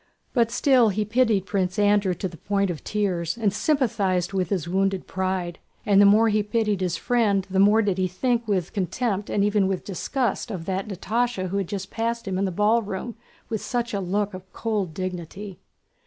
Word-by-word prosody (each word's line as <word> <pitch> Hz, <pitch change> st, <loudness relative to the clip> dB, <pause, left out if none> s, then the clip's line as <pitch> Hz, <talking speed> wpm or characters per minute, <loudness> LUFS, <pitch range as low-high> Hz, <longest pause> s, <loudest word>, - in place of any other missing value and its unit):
But 235 Hz, -3 st, +3 dB
still 245 Hz, -1 st, +4 dB
he 210 Hz, +1 st, -1 dB
pitied 220 Hz, -3 st, +2 dB
Prince 190 Hz, -2 st, -1 dB
Andrew 205 Hz, -2 st, +3 dB
to 190 Hz, -, -3 dB
the 175 Hz, -, -11 dB
point 200 Hz, -1 st, 0 dB
of 160 Hz, -, -7 dB
tears 185 Hz, -4 st, -1 dB
and 210 Hz, -4 st, +1 dB
sympathized 200 Hz, -, 0 dB
with 185 Hz, -3 st, 0 dB
his 180 Hz, -5 st, -1 dB
wounded 195 Hz, +1 st, 0 dB
pride, 185 Hz, -2 st, -2 dB, 0.3 s
and 200 Hz, -2 st, +5 dB
the 200 Hz, -, +7 dB
more 220 Hz, +3 st, +5 dB
he 215 Hz, 0 st, +2 dB
pitied 210 Hz, -2 st, 0 dB
his 180 Hz, -2 st, 0 dB
friend 210 Hz, -6 st, +1 dB
the 190 Hz, -, +1 dB
more 210 Hz, +3 st, +5 dB
did 195 Hz, -2 st, 0 dB
he 185 Hz, -, +2 dB
think 235 Hz, +5 st, -1 dB
with 190 Hz, -5 st, -1 dB
contempt 205 Hz, +2 st, -2 dB
and 200 Hz, -, +1 dB
even 205 Hz, -1 st, +2 dB
with 190 Hz, -1 st, -2 dB
disgust 230 Hz, -, -2 dB
of 185 Hz, -6 st, -5 dB
that 190 Hz, +2 st, -2 dB
Natásha 210 Hz, 0 st, -1 dB
who 195 Hz, -, -2 dB
had 195 Hz, -3 st, -1 dB
just 195 Hz, 0 st, -5 dB
passed 230 Hz, 0 st, -2 dB
him 190 Hz, -1 st, -1 dB
in 200 Hz, -, +1 dB
the 190 Hz, -, -1 dB
ballroom 210 Hz, +2 st, 0 dB, 0.3 s
with 220 Hz, -2 st, -3 dB
such 240 Hz, -2 st, -2 dB
a 200 Hz, -, 0 dB
look 200 Hz, +2 st, -1 dB
of 185 Hz, 0 st, -10 dB
cold 205 Hz, -8 st, -2 dB
dignity. 185 Hz, +1 st, -6 dB
200 Hz, 200 wpm, -24 LUFS, 185-220 Hz, 0.3 s, the